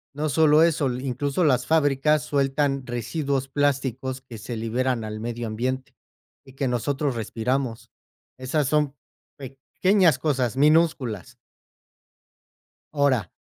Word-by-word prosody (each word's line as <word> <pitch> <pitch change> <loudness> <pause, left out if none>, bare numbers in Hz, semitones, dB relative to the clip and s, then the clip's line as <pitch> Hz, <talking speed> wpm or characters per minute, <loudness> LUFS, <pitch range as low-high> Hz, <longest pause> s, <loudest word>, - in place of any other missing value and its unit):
No 155 +1 -1
solo 155 +1 +5
eso, 155 -5 +2
incluso 135 +6 -2
las 130 -5 +2
fábricas 150 -1 +2
sueltan 140 -1 0
residuos 130 +3 -2
plásticos 135 -2 -1
que 125 -3 -11
se 110 +3 -6
liberan 120 +2 -1
al 110 0 -5
medio 120 +1 -4
ambiente 130 +4 -3 0.5
y 135 - -15
que 135 0 -2
nosotros 135 +3 -1
respiramos. 115 +2 -3 0.5
Esas 130 +3 -1
son 150 -1 +1 0.4
pequeñas 155 +6 +1
cosas 130 -6 0
minúsculas. 150 - +2 1.6
Ahora. 135 - +2
135 Hz, 110 wpm, -24 LUFS, 125-145 Hz, 1.6 s, solo